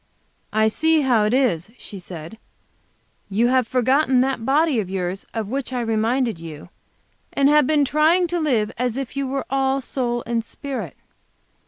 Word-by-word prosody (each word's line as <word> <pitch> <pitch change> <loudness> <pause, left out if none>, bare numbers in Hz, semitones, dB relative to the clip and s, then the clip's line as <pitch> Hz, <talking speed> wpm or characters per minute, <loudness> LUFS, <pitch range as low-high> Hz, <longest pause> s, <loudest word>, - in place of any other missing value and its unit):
"I 220 0 +3
see 320 +7 +2
how 240 -6 +3
it 215 - +1
is," 215 -9 +1
she 200 - -9
said; 175 +3 -9 0.9
"you 225 +5 +2
have 255 -2 +2
forgotten 260 +1 +3
that 260 -3 -1
body 285 +1 +2
of 195 -4 -3
yours, 185 0 -3
of 225 -3 -3
which 260 +2 -3
I 250 -1 -1
reminded 225 -1 0
you, 160 -1 -9 0.6
and 275 0 +3
have 295 -2 +4
been 295 -1 +3
trying 315 +6 +3
to 350 +1 -1
live 240 -9 +1
as 250 -1 -1
if 270 -1 -5
you 275 -1 -1
were 270 +1 -3
all 270 0 +1
soul 240 -2 -2
and 235 -1 -1
spirit. 240 - -6
250 Hz, 170 wpm, -22 LUFS, 220-275 Hz, 0.9 s, have